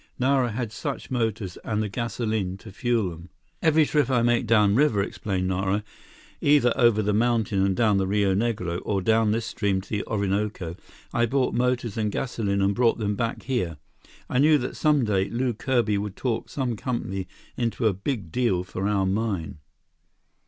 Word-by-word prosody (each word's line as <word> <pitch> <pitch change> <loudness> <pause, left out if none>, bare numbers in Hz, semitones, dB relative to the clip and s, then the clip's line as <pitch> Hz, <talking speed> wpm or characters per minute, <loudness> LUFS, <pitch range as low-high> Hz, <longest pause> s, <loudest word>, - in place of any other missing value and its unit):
Nara 130 -1 +2
had 115 -1 -3
such 140 +4 -5
motors 110 -6 -2
and 110 -1 -1
the - - -2
gasoline 110 -3 -2
to 110 +1 -12
fuel 115 -3 0
them. 85 +2 -11 0.3
"Every 160 -1 +4
trip 150 -1 +1
I 125 -3 +2
made 120 0 +2
downriver," 105 +1 +4
explained 95 -2 -3
Nara, 95 +2 0 0.6
"either 145 -5 +4
over 120 -4 +4
the 105 +1 +1
mountain 110 -3 +2
and 95 -1 +1
down 110 -3 +3
the 95 -1 +1
Rio 100 -1 +2
Negro, 95 -5 -1
or 100 -3 -1
down 110 0 +3
this 110 +1 -1
stream 100 -4 0
to - - -17
the 105 -2 -1
Orinoco, 100 -4 -1 0.4
I 120 0 +2
bought 130 +1 +1
motors 125 -3 0
and 105 -2 0
gasoline 100 -5 -1
and 100 +1 +2
brought 120 +1 +2
them 105 -2 -1
back 115 +1 -2
here. 115 - -2 0.5
I 125 - 0
knew 150 +2 +6
that 130 -2 -4
some 150 -5 +2
day, 100 -2 +1
Lew 120 +3 -1
Kirby 115 -3 +1
would 100 -1 -5
talk 115 -3 -2
some 130 -4 -2
company 95 -5 -3 0.3
into 115 -1 -1
a 110 - +4
big 100 - -4
deal 100 -7 +1
for 95 +1 -3
our 100 -2 +1
mine. 95 -6 -2
110 Hz, 180 wpm, -25 LUFS, 100-120 Hz, 0.6 s, knew